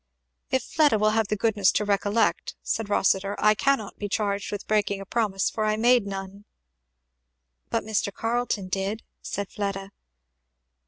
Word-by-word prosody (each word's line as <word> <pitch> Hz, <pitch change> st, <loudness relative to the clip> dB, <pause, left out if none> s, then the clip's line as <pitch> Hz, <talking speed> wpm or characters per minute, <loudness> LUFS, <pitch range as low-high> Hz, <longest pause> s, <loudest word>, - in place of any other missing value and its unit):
"If 260 Hz, -, +1 dB
Fleda 295 Hz, -8 st, +3 dB
will 215 Hz, +1 st, +3 dB
have 220 Hz, -1 st, +1 dB
the 210 Hz, -, 0 dB
goodness 205 Hz, -2 st, +3 dB
to 210 Hz, -, +1 dB
recollect," 205 Hz, +2 st, +1 dB
said 225 Hz, -2 st, -2 dB
Rossitur, 195 Hz, 0 st, +2 dB
"I 215 Hz, 0 st, +5 dB
cannot 220 Hz, -2 st, 0 dB
be 205 Hz, -, -3 dB
charged 200 Hz, -1 st, -1 dB
with 205 Hz, -1 st, -5 dB
breaking 205 Hz, -2 st, +1 dB
a 195 Hz, -, -7 dB
promise, 200 Hz, -3 st, 0 dB
for 220 Hz, -, -2 dB
I 215 Hz, 0 st, +1 dB
made 240 Hz, -1 st, +4 dB
none." 195 Hz, +1 st, -6 dB, 1.2 s
"But -, -, 0 dB
Mr. 210 Hz, -2 st, -1 dB
Carleton 230 Hz, -3 st, -1 dB
did," 195 Hz, +4 st, -2 dB, 0.2 s
said 200 Hz, -1 st, -4 dB
Fleda. 195 Hz, -1 st, -4 dB
205 Hz, 155 wpm, -26 LUFS, 200-220 Hz, 1.2 s, I